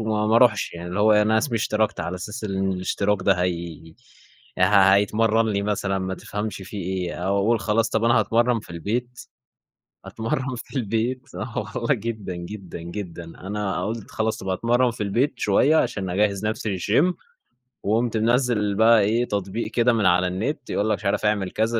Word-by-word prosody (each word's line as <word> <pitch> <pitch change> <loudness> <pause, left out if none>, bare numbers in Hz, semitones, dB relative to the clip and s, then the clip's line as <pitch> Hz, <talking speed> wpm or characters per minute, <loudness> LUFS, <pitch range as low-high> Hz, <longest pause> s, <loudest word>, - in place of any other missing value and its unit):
وما 110 -1 0
ما 110 +1 +4
أروحش، 115 -4 +3
يعني 85 +1 -7
اللي 90 +4 -2
هو 110 +1 +5
أنا 105 +1 +4
اسمي 120 +1 -1
اشتركت، 110 -2 0
على 85 +2 -3
أساس 105 +6 -6
إن 95 -1 -1
الاشتراك 100 +2 0
ده 100 - +4
هي 85 -2 -4 0.6
ه 90 - +5 0.3
هيتمرن 110 +2 +2
لي 100 -2 0
مثلًا، 100 -2 -1
ما 95 0 -3
تفهمش 105 +3 -5
في 95 +3 -9
إيه! 95 -2 -3
أو 95 +3 -1
أقول 115 +3 +2
خلاص 110 +1 +1
طب 110 -1 0
أنا 115 - +4
هأتمرن 115 +2 +2
في 105 - -15
البيت، 120 +9 -3 0.8
أتمرّن 130 +4 -3
في 120 - -9
البيت 120 +2 -1
آه 115 - -5 0.2
والله 120 +3 +1
جدًا، 110 -5 -5
جدًا، 90 +1 -8
جدًا. 85 0 -7
أنا 95 +2 -4
قلت 110 0 -5
خلاص 110 0 -1
طب 95 - -7
هاتمرن 120 +6 +2
في 115 - -5
البيت 120 +8 0
شوية؛ 105 +9 +3
عشان 105 - 0
أجهز 100 +2 0
نفسي 110 -2 -2
للGYM. 145 - +2 0.7
وقمت 115 +2 +1
منزّل 115 -3 +1
بقى 110 +1 +6
إيه؟ 115 +4 +1
تطبيق 100 +1 -3
كده 120 +1 +3
من 110 -3 +1
على 90 0 +4
النت، 110 +9 -3
يقول 105 +2 0
لك 105 - +1
مش 105 - -13
عارف 100 +2 0
أعمل 105 -3 0
كذا، 115 +1 0
105 Hz, 180 wpm, -23 LUFS, 95-115 Hz, 0.8 s, بقى